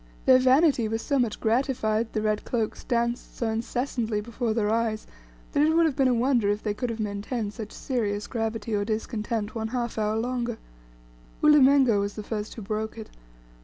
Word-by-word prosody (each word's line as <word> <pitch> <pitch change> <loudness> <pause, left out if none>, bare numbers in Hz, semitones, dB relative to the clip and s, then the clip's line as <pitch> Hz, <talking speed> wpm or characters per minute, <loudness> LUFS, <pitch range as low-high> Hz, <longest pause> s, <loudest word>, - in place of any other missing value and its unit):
Their 255 0 +7
vanity 260 -2 +4
was 225 +1 -3
so 280 -2 +1
much 235 -4 0
gratified, 225 -2 0
the 215 - -1
red 215 -1 0
cloaks 225 -3 -2
danced 235 0 -2
so 230 - -1
incessantly 230 -1 -2
before 235 +2 -3
their 215 -1 +1
eyes, 225 -1 0 0.5
that 285 - +2
it 315 +2 +3
would 335 0 +5
have 305 -5 0
been 270 -2 +3
a 255 - +3
wonder 240 -3 +2
if 205 +1 -1
they 210 - -1
could 245 +3 -3
have 230 -1 -4
maintained 210 +1 -3
such 215 -2 -7
serious 210 -6 -2
gravity 225 -2 -3
or 205 -1 +1
discontent 215 0 -3
one 220 -1 -3
half 235 -1 -3
hour 215 0 0
longer. 240 0 -2 0.9
Ulimengo 275 -6 +6
was 200 0 -2
the 215 - -6
first 210 0 -5
who 225 - -7
broke 215 +2 -3
it. 220 - -9
225 Hz, 190 wpm, -26 LUFS, 215-250 Hz, 0.9 s, Their